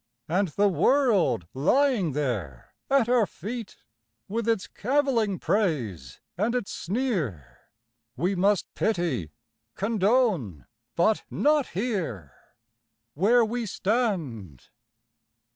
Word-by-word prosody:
And 185 +5 +1
the 200 +6 +2
world 210 - +2
lying 195 - +2
there 110 - -3 0.2
at 270 -4 +3
our 240 -4 +3
feet, 225 +3 -7 0.5
With 225 +2 -3
its 225 -4 +1
cavilling 240 -5 0
praise 135 - -1 0.2
and 215 +7 0
its 245 -5 -2
sneer, 175 - -3 0.6
We 180 +8 0
must 195 +1 +2
pity, 170 - -1 0.5
condone, 200 - +1 0.3
but 215 +6 +2
not 295 -1 +2
hear, 175 - -3 0.8
Where 225 - +4
we 230 +1 -3
stand. 170 - -2
200 Hz, 95 wpm, -26 LUFS, 150-235 Hz, 0.8 s, Where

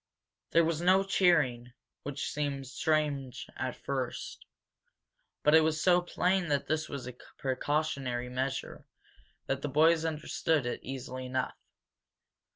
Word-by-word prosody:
There 170 0 +4
was 165 0 -1
no 185 +2 +5
cheering, 150 -11 +2 0.3
which 145 +1 -4
seemed 140 -2 -2
strange 140 -1 -1
at 130 -1 -3
first, 130 -3 -4 1.0
but 150 - +5
it 160 - +8
was 155 0 +1
so 180 +1 +4
plain 180 +1 +1
that 145 -2 0
this 155 0 -1
was 140 -3 -5
a 125 - -6 0.2
precautionary 135 -2 -1
measure 130 +2 -3 0.6
that 135 0 -2
the 145 - -2
boys 160 +3 +4
understood 155 -2 0
it 120 - -2
easily 130 0 -6
enough. 130 0 -1
145 Hz, 130 wpm, -31 LUFS, 130-160 Hz, 1.0 s, it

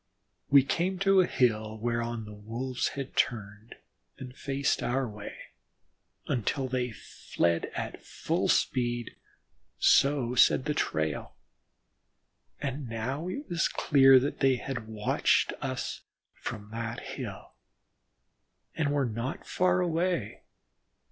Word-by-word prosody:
We 140 -1 +7
came 180 +7 0
to 195 0 +5
a 180 - +1
hill 110 -3 +1
whereon 115 0 -2
the 105 - -9
Wolves 115 +5 -3
had 135 -1 -5
turned 110 -1 -2 0.4
and 130 -2 -9
faced 140 -1 -1
our 130 +1 0
way, 105 -1 -8 0.9
then 120 - 0 0.5
fled 85 -1 -1
at - - -5
full - - -1
speed, 120 -2 0 0.6
so 135 -4 +4
said 125 +1 +5
the 150 - 0
trail, 80 - -2 1.2
and 135 -2 -4
now 130 +9 -3
it 280 +11 -5
was 170 -1 +1
clear 135 -2 +6
that 140 +3 -3
they 135 -2 +4
had 120 -3 -5
watched 110 -1 +1
us - - -3 0.3
from 105 0 -7
that 115 0 -4
hill, - - -7 1.2
and 150 -3 0
were 145 -2 +1
not 115 +4 -4
far 180 0 +2
away. 170 - -1
125 Hz, 115 wpm, -29 LUFS, 110-145 Hz, 1.2 s, We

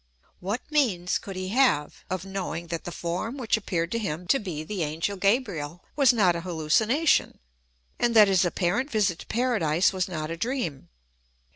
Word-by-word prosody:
What 205 +7 -3
means 205 -13 +1
could 195 - -8
he 185 0 -4
have 220 - +1
of 185 0 -3
knowing 185 -3 -4
that 165 -1 -4
the 175 - -5
form 175 +10 -3
which 245 -5 +1
appeared 175 -6 -2
to 230 - 0
him 180 -4 -4
to 275 - +4
be 170 -7 -5
the 190 +3 -4
angel 160 +6 -2
Gabriel 185 - -1
was 275 -4 +5
not 195 -8 +3
a 170 - -3
hallucination, 185 - +1 0.6
and 235 -1 +1
that 215 -2 +8
his 190 -2 +3
apparent 185 - 0
visit 205 - +1
to - - -11
Paradise 205 -9 +1
was 185 -1 -1
not 155 -2 -4
a 165 - -4
dream 175 - -3
185 Hz, 175 wpm, -26 LUFS, 170-225 Hz, 0.6 s, that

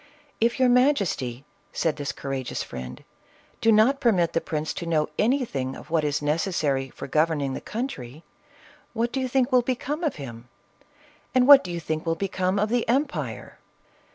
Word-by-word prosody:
" 290 -5 -35
If 235 +3 +2
your 255 - +5
ma 250 +4 +5
jesty," 135 - -3 0.3
said 160 -2 -1
this 145 -2 -3
courageous 135 -2 -4
friend, 65 0 -8 0.3
" - - -32
do 225 - +4
not 225 +6 +4
permit 180 -10 +2
the 165 - +1
prince 155 -2 -3
to 170 - -6
know 155 -2 +1
anything 210 - 0
of - - -12
what 165 -2 +2
is 145 0 -1
necessary 145 -4 0
for - - -8
gov 155 +4 +3
erning 145 -5 -2
the - - -5
country, 160 - -6 0.7
what 235 +1 -1
do 270 - -2
you 260 - -1
think 255 +1 +1
will 250 -1 +5
become 260 +6 -3
of 310 - 0
him? 120 -4 -9 0.9
and 255 0 +4
what 285 -1 +10
do 180 - -7
you 170 - -3
think 155 -1 -3
will 165 - +1
become 185 +1 -1
of 210 +1 +1
the 240 -1 0
em 270 +5 +3
pire?" 285 - -7
180 Hz, 195 wpm, -25 LUFS, -, 0.9 s, what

